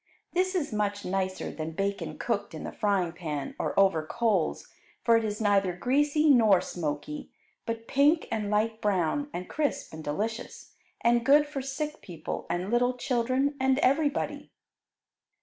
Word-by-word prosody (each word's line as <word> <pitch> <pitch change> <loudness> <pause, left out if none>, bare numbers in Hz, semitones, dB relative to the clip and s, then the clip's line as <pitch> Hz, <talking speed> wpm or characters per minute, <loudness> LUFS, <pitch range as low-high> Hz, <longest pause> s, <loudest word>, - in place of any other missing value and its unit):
This 370 +2 +1
is 300 -10 -1
much 205 -1 -1
nicer 190 0 -2
than 155 +2 -5
bacon 195 +3 -2
cooked - - -2
in - - -6
the - - -5
frying 195 -5 0
pan 155 -5 -4
or - - 0
over 190 -5 +4
coals, 205 -1 0 0.4
for 230 - +5
it 230 - +3
is 210 -1 -3
neither 200 -4 +2
greasy 290 - +2
nor 225 -9 +6
smoky, 150 -4 -4 0.4
but 230 0 -4
pink 295 +4 +3
and 215 -2 -1
light 220 +2 0
brown, 205 - 0
and 180 +1 -5
crisp 295 - -2
and 160 0 -7
delicious, 215 +10 -4 0.3
and 235 0 +3
good 290 +3 +6
for 290 -2 -5
sick 295 +3 -4
people 165 -4 -6
and 175 +4 -2
little 245 +1 +2
children 255 +3 0
and 265 0 +3
everybody. 285 +1 +1
220 Hz, 155 wpm, -28 LUFS, 185-270 Hz, 0.4 s, nor